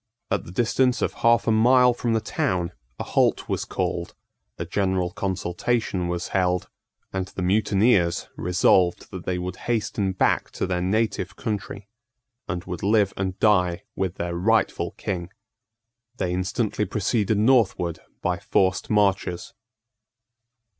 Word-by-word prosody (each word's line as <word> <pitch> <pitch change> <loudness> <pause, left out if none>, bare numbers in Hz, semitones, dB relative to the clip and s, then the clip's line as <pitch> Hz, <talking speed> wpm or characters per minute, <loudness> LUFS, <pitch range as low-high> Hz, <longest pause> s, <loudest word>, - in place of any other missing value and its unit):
At - - 0
the - - -9
distance 120 +5 +1
of - - 0
half 115 0 +3
a 115 - +2
mile 125 +3 +5
from 120 -1 -1
the 110 - +2
town 95 - -1 0.3
a - - -4
halt - - +1
was - - -2
called: - - -3 0.4
a - - -4
general 95 -3 0
consultation 95 +1 -1
was 85 0 -3
held; 90 -2 0 0.4
and 95 -1 -2
the 95 - -5
mutineers 100 -1 +2
resolved 90 0 +2
that 95 -2 -7
they 90 -1 0
would 90 0 -4
hasten 105 -4 0
back 95 - +1
to - - -2
their 90 -1 -1
native 110 +5 0
country, 100 -1 -5 0.6
and 90 -3 -3
would 90 -3 -6
live 100 -1 +2
and 95 0 -3
die 90 -4 +2
with 95 -2 -2
their 85 0 -3
rightful 110 +6 +1
King. 90 -2 -4 0.9
They 90 -1 -1
instantly 100 +4 -1
proceeded 105 +1 0
northward 100 -8 +2 0.2
by 90 +1 0
forced 95 -3 +1
marches. 100 -4 +1
95 Hz, 140 wpm, -24 LUFS, 90-110 Hz, 0.9 s, mile